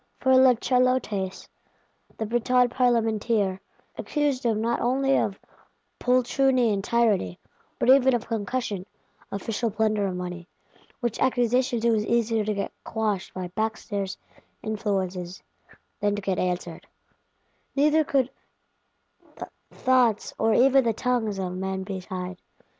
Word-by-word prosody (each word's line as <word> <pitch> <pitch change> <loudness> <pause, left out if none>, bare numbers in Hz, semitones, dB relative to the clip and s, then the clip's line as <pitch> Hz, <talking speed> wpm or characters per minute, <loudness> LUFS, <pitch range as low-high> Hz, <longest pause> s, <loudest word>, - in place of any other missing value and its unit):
For 260 0 +4
La 260 -1 +6
Chalotais, 250 -6 0 0.7
the 220 - -2
Breton 245 +2 +2
Parlementeer, 225 -5 +1 0.4
accused 290 -4 -1
him 225 -3 +1
not 235 +2 0
only 270 +3 +2
of 195 -1 0 0.6
poltroonery 255 -1 +2
and 195 -1 -2
tyranny, 210 - +1 0.4
but - - -1
even 265 -1 +6
of 235 - -3
concussion 210 -3 -3 0.4
(official 225 +3 -2
plunder 215 -1 0
of 185 - -3
money); 180 -1 -6 0.5
which 240 -3 -2
accusations 245 -1 +1
it 235 - +4
was 215 -1 0
easier 230 -2 +1
to 210 0 -1
get 200 - -3
"quashed" 215 -4 -2
by 185 -1 -4
backstairs 205 -1 -3 0.5
Influences 190 -4 -3 0.6
than 205 0 +1
to 205 - -4
get 190 -2 -1
answered: 180 -2 -3 0.9
neither 300 +2 +4
could 270 -3 +1 1.0
the - - -7 0.2
thoughts, 250 -4 +1
or 225 0 +3
even 270 +1 +5
the 230 -1 +1
tongues, 225 -3 -1
of 185 -2 -3
men 190 +1 -3
be 190 -1 -5
tied. 180 0 -6
220 Hz, 130 wpm, -25 LUFS, 195-250 Hz, 1.0 s, La